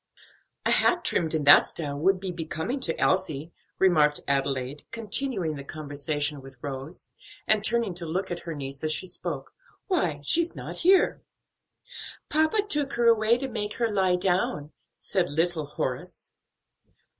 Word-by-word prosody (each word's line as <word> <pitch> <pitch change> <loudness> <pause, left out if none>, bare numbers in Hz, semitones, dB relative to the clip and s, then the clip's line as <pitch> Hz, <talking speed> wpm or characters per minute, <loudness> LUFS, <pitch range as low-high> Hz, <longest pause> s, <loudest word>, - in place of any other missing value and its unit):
"A - - +3
hat 350 -1 +3
trimmed 160 -1 +1
in 155 - 0
that 145 - +8
style 145 -4 -3
would 185 +4 +2
be 190 -1 -4
becoming 170 - -3
to 165 -10 -2
Elsie," 165 -4 0 0.2
remarked 155 -6 +4
Adelaide, 135 0 -1
continuing 225 - 0
the 140 -2 -7
conversation 145 0 -2
with 135 -1 -13
Rose, 140 +4 -7 0.3
and 215 -1 +2
turning 230 -3 +1
to 170 -1 -6
look 185 +4 -3
at 175 - -3
her 165 -2 -6
niece 135 0 -7
as 155 - 0
she 170 - 0
spoke. 170 -6 -5 0.3
"Why, 180 - 0
she's 335 - +2
not - - -7
here." 370 +1 +3 1.1
"Papa 315 +7 +2
took 295 -6 +1
her 240 - +1
away 230 0 +4
to 270 +2 -3
make 210 -4 -4
her 230 -2 0
lie 190 -2 +2
down," 180 -5 -1 0.3
said 185 -3 -1
little 160 0 +1
Horace. 145 - -5
175 Hz, 155 wpm, -26 LUFS, 150-220 Hz, 1.1 s, that